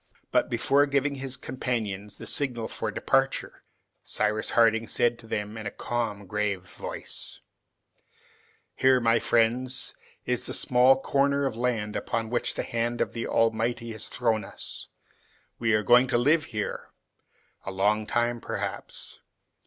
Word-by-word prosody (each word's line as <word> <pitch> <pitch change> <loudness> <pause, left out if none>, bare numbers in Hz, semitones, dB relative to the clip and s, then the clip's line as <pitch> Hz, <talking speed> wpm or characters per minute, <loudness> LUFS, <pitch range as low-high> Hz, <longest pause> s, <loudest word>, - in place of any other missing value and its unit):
But - - +2
before 135 +4 +3
giving 140 +1 +1
his 135 -1 -4
companions 110 -6 -3
the - - -8
signal 125 -5 -1
for - - -3
departure, - - 0 0.4
Cyrus 105 0 0
Harding 115 -1 +4
said 120 +2 +1
to 115 - -13
them 105 0 -3
in 105 - -5
a - - 0
calm, 110 -3 -3
grave 100 -1 -1
voice, 95 - -6 1.3
"Here, 130 -1 +5
my 115 -1 +3
friends, 125 +3 +1 0.3
is - - -1
the - - -2
small 130 +2 +5
corner 140 +1 +2
of 130 -5 -1
land 115 -3 -1
upon 115 -1 -2
which 120 - -1
the - - -1
hand 120 +1 -1
of - - 0
the 115 - -3
Almighty 115 +1 +1
has 110 -1 -4
thrown 115 -3 0
us. - - -8 0.7
We 115 -1 +2
are 105 - +1
going 125 +3 +6
to 130 - +2
live 150 +5 +3
here; 105 -2 -4 0.7
a - - -5
long 105 +3 +1
time, 120 0 0
perhaps. - - -4
115 Hz, 145 wpm, -27 LUFS, 110-125 Hz, 1.3 s, going